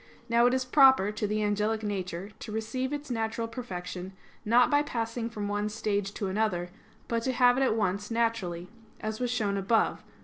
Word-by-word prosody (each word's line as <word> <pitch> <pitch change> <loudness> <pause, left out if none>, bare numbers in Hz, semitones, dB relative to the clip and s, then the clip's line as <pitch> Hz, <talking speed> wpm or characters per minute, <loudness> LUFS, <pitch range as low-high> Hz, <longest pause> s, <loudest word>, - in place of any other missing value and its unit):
Now 235 0 +4
it 245 - +2
is 260 -1 -1
proper 265 -6 +6
to 210 0 -2
the 215 +1 0
angelic 210 +1 0
nature 190 -1 -4
to 220 - -7
receive 220 +5 -2
its 290 -2 -4
natural 230 0 -2
perfection 190 -5 -6 0.3
not 235 +5 +4
by 290 0 +5
passing 230 -4 -3
from 210 -3 -4
one 205 +1 -1
stage 205 -2 -1
to 205 - -3
another; 190 -3 -1 0.4
but 230 -1 0
to 260 - 0
have 245 -1 +5
it 265 - 0
at 260 -5 +3
once 205 -1 -1
naturally, 225 -7 -1 0.3
as 215 0 -4
was 250 -1 -1
shown 210 -5 0
above 210 +4 +2
(A. - - -24
220 Hz, 195 wpm, -29 LUFS, 205-240 Hz, 0.4 s, proper